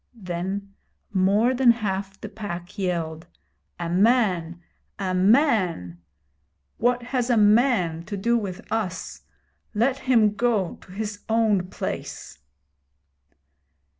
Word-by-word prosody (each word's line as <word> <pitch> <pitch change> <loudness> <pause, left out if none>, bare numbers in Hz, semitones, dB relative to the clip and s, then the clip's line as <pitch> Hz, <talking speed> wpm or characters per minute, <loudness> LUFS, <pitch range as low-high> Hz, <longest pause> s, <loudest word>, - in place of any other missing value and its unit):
Then 195 0 -5 0.4
more 205 +6 +3
than 255 -1 +4
half 195 -4 0
the - - -7
Pack 185 -4 -7
yelled: 165 -4 -2 0.5
A 170 - -3
man! 180 -3 +2 0.4
a 190 -2 -2
man! 185 - +2 0.8
What 245 +1 +1
has 250 0 -1
a 240 - +3
man 210 -6 +3
to 205 +1 -5
do 235 +5 +1
with 200 -6 -3
us? 205 -5 -3 0.5
Let 255 +5 +1
him 225 -5 +3
go 215 -5 0
to - - -16
his 210 +1 -5
own 220 -5 +2
place. - - -6
205 Hz, 110 wpm, -24 LUFS, 180-230 Hz, 0.8 s, than